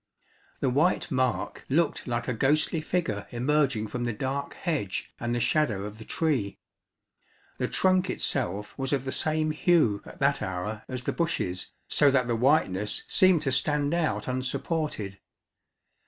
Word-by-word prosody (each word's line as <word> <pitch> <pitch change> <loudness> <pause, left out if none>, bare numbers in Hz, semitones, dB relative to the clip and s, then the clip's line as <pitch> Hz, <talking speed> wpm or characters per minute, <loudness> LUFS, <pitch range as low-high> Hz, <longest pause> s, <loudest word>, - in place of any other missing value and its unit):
The 130 - +2
white 150 +8 +2
mark 130 -1 -1
looked 155 +2 +1
like 120 -1 -2
a 125 - 0
ghostly 150 +6 +1
figure 155 - -2
emerging 130 -2 +1
from 120 +3 -4
the 120 -1 -1
dark 135 +5 -3
hedge 145 - -3
and 120 0 -1
the - - 0
shadow 120 -6 +1
of 105 +1 -8
the 110 - -9
tree. 130 -12 -1 1.0
The - - +1
trunk 185 0 +2
itself 105 -5 -1
was 135 +1 0
of 135 -2 +1
the 130 - -2
same 155 +1 +1
hue 155 - +3
at - - -11
that - - +2
hour 95 +4 -4
as 125 -1 -5
the - - -1
bushes, 95 - -1 0.2
so 145 - +4
that 130 -3 +2
the 120 - +1
whiteness 110 - +1
seemed 185 -5 +4
to 135 - 0
stand 145 +3 +1
out 170 -2 0
unsupported. 130 - -2
130 Hz, 155 wpm, -27 LUFS, 110-155 Hz, 1.0 s, so